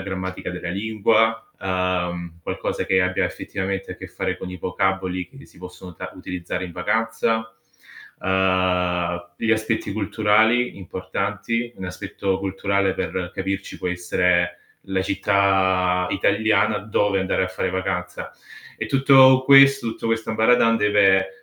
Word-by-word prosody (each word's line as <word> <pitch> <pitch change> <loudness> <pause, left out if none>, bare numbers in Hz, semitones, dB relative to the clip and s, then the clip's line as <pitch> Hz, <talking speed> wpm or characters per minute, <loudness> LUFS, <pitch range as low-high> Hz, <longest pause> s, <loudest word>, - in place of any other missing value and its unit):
grammatica 95 -1 -5
della 90 -1 -6
lingua, 110 +2 +1
uhm, 90 -2 -2
qualcosa - - -3
che 95 - +3
ha - - +2
abbia 90 - 0
effettivamente 95 0 -4
a - - -11
che 95 - -9
fare 95 +1 -3
con 90 - -7
i 90 - -7
vocaboli 95 0 -2
che 135 +1 -15
si - - -21
possono 90 -1 -11
ta - - -7
utilizzare 90 0 -5
in 90 - -8
vacanza. 110 +3 -1 0.7
Uhm, 90 -2 0
gli 110 - -1
aspetti 110 -2 0
culturali 110 +3 +2
importanti, 100 +5 -3
un 95 - -7
aspetto 95 +1 -3
culturale 100 0 -1
per 90 -1 -3
capirci 95 0 -4
può 90 - -3
essere 90 0 0 0.3
la 95 -1 -1
città 95 -2 +2
italiana 105 +1 +2
dove 105 -1 0
andare 95 0 0
a 90 - -4
fare 95 0 -3
vacanza. 95 0 -4 0.5
E - - -4
tutto 135 -1 +6
questo 135 -2 +6
tutto 115 - -5
questo 115 -1 -1
ambaradan 115 +1 +3
deve, 105 -2 +3
95 Hz, 135 wpm, -22 LUFS, 90-110 Hz, 0.7 s, tutto